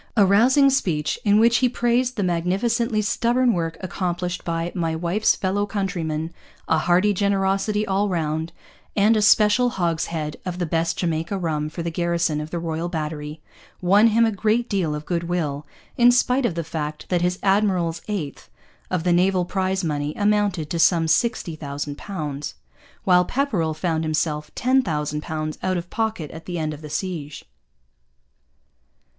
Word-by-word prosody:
A 205 - +6
rousing 255 +8 +5
speech, 170 - 0
in 205 0 +4
which 230 +1 +5
he 250 +1 +3
praised 245 +1 +1
the 205 - 0
magnificently 215 +6 0
stubborn 240 +3 +2
work 165 -2 -2
accomplished 180 -1 -3
by 165 0 -2
'my 165 -3 -1
wife's 175 +6 +1
fellow 200 +2 -1
countrymen,' 170 -6 -3 0.3
a 160 - +3
hearty 180 +5 +3
generosity 200 +2 +1
all 200 +1 0
round, 160 -2 -2 0.4
and 210 +2 +4
a 215 - +2
special 210 +4 +5
hogshead 165 -6 -2
of 180 -1 -4
the 180 - -1
best 165 +1 -1
Jamaica 165 +2 -1
rum 155 -4 -2
for 165 +2 -6
the 170 - -2
garrison 170 -2 0
of 150 - -6
the 170 - -4
Royal 165 0 -3
Battery, 155 -2 -5 0.4
won 200 +5 +5
him 230 +1 +4
a 225 - +1
great 220 +4 0
deal 180 -8 -1
of 150 0 -6
goodwill, 170 -4 -2 0.3
in 245 0 +7
spite 250 +1 +2
of 175 - -4
the 170 - -2
fact 155 -1 -5
that 180 -2 +1
his 180 +1 0
'Admiral's 190 -5 +1
eighth' 180 -10 -5 0.4
of 180 -3 -1
the 175 -1 +2
naval 180 +1 +2
prize 190 0 -1
money 150 -2 -2
amounted 205 -6 +1
to 170 - -1
some 165 -1 +4
sixty 165 0 +1
thousand 145 -1 -5
pounds, 150 -7 -5 0.5
while 180 -1 +5
Pepperrell 180 - -1
found 160 -1 -1
himself 155 -1 -1
ten 260 +2 +3
thousand 150 - -2
pounds 155 0 -4
out 185 -1 0
of 175 0 -6
pocket 220 -9 -2
at 160 0 -10
the 175 -1 -3
end 155 -1 -2
of 150 - -10
the 150 - -8
siege. 155 -4 -4
175 Hz, 165 wpm, -23 LUFS, 160-205 Hz, 0.5 s, in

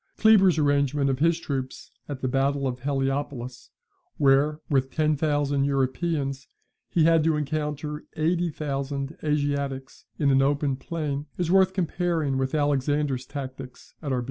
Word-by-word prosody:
[Kleber's 195 -6 +5
arrangement 140 -1 +2
of 130 - -2
his 165 +2 +3
troops 135 -5 -5 0.2
at 140 -3 -5
the 130 - 0
battle 135 +2 +1
of 125 -1 -4
Heliopolis, 135 -2 -3 0.5
where, 145 +2 +3
with 135 -3 +1
ten 155 +1 +1
thousand 145 -2 +1
Europeans, 135 +1 -1 0.4
he 165 - +2
had 165 -1 +4
to 160 -1 +2
encounter 150 0 -3
eighty 170 +2 +1
thousand 140 -1 -4
Asiatics 140 -3 -2
in 140 -2 +2
an 135 0 +4
open 140 0 +1
plain, 150 -1 -4
is 175 -2 -1
worth 190 0 +4
comparing 170 -6 0
with 130 +2 -1
Alexander's 145 -2 0
tactics 130 -2 -8
at 145 -4 -4
Arbela. 130 - +1
145 Hz, 145 wpm, -26 LUFS, 135-155 Hz, 0.5 s, Kleber's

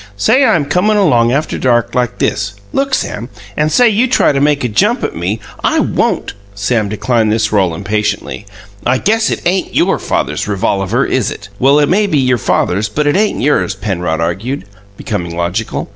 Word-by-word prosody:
"Say 235 - +3
I'm 195 - +3
comin' 180 +9 +1
along 120 - +3
after 150 +4 -1
dark 120 -3 +1
like 125 -2 -1
this 100 - -1 0.2
look, 275 -1 +1
Sam! 115 +4 -4 0.3
And 150 +1 0
say 245 +9 +5
you 225 +3 +2
try 250 - +3
to 140 -1 0
make 145 -1 +2
a - - +1
jump 105 -3 +1
at - - -3
me 90 +6 -2
" - - -19
"I - - +2
won't!" - - 0 0.2
Sam 105 +1 0
declined 110 +1 0
this 110 0 0
role 95 -5 +1
impatiently. 105 +2 -3 0.4
"I 125 +2 +2
guess 220 +8 +1
it - - -3
ain't 185 +2 0
YOUR - - +2
father's 75 +1 -2
revolaver, 100 +4 0
is 130 -6 0
it?" 100 - -9
"Well, 135 +3 +4
it 145 -1 +3
may 205 +5 +2
be 155 - +1
your 125 -3 +2
father's 100 +1 0
but 150 +8 -1
it 145 - +2
ain't 210 +2 +1
yours," 140 -8 +1
Penrod 90 -5 -2
argued, 95 +7 -3 0.3
becoming 85 -6 -4
logical. 90 +6 -2
120 Hz, 190 wpm, -14 LUFS, 100-150 Hz, 0.4 s, say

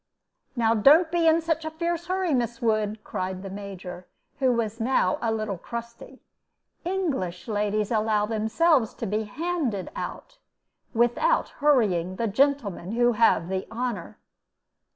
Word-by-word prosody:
"Now 225 -2 +3
don't 300 - +5
be 340 -1 +2
in 325 +1 +5
such 325 -1 -1
a 315 - -3
fierce 340 +1 -3
hurry, 370 -3 0
Miss 235 -2 -1
Wood," 215 -2 0
cried 185 0 -4
the 195 - -6
Major, 190 -3 -8 0.3
who 260 -2 +3
was 230 -1 -1
now 225 -6 +1
a 230 - 0
little 215 -4 -2
crusty; 235 +4 -8 0.6
"English 290 - -2
ladies 210 0 -1
allow 215 -2 +2
themselves 225 +5 +2
to - - -4
be 215 +1 -1
handed 275 - -2
out, - - -7 0.6
without 240 - +2
hurrying 205 - +2
the 230 - -1
gentlemen 220 -6 0
who 240 +1 +3
have 220 -7 +3
the 190 0 -3
honor." 225 -5 -4
230 Hz, 140 wpm, -26 LUFS, 205-290 Hz, 0.6 s, don't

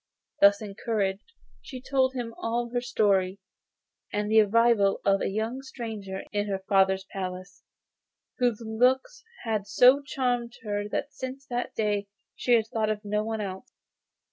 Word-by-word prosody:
Thus 200 +1 +6
encouraged, 200 - -2 0.3
she 260 - -8
told 265 0 +1
him 235 -2 -4
all 235 +1 -2
her 245 - +1
story, 200 -6 +1 0.7
and 210 - 0
of - - -4
the 220 0 +7
arrival 215 -1 +3
of 195 0 +3
a - - 0
young 220 +6 -2
stranger 220 -7 -6
in 205 0 -1
her 195 -1 -1
father's 190 -1 +3
palace, 185 -1 -6 0.8
whose 240 -3 +1
looks 260 - +1 0.2
had 215 -3 -2
so 250 +6 +6
charmed 245 -4 -1
her 205 -1 -3
that 285 +6 -3
since 265 +1 -7
that 245 0 -3
day 205 -2 0 0.3
she 245 - +1
had 225 -2 +4
thought 220 -1 -1
of 215 -1 -1
no 210 +1 0
one 220 0 -3
else. 195 +4 -6
220 Hz, 155 wpm, -27 LUFS, 200-245 Hz, 0.8 s, the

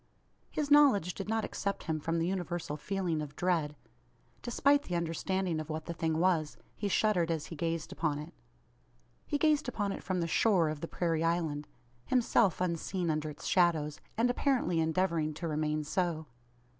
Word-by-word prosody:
His 295 -1 -2
knowledge 260 - +6
did 195 +1 -6
not 225 -1 0
except 200 0 -3
him 160 -2 -2
from 165 +2 -1
the 165 - +1
universal 175 -4 -2
feeling 170 0 -2
of 145 -1 -7
dread. 165 -5 0 0.7
Despite 280 +4 +3
the 180 - -4
understanding 170 +1 -1
of 155 0 -6
what 155 0 -4
the 170 - -4
thing 160 -1 -1
was, 165 -3 +1 0.2
he 205 - -2
shuddered 195 -4 +2
as 160 -3 -1
he 165 - -8
gazed 165 0 -2
upon 150 -3 -1
it. 150 +4 -8 0.9
He 295 - 0
gazed 300 -3 +2
upon 205 -4 -1
it - - -5
from 185 -1 -2
the 170 - 0
"shore" 175 -1 +3
of 155 -1 -5
the 165 - -3
prairie 165 -2 0
island; 160 -3 0 0.4
himself 235 - +2
unseen 175 0 -1
under 155 0 -2
its 150 - -10
shadows, 160 -5 +2 0.2
and 240 +2 +3
apparently 245 - +1
endeavouring 160 -2 +1
to 170 +2 -4
remain 155 0 -1
so. 165 0 -1
170 Hz, 175 wpm, -31 LUFS, 155-195 Hz, 0.9 s, knowledge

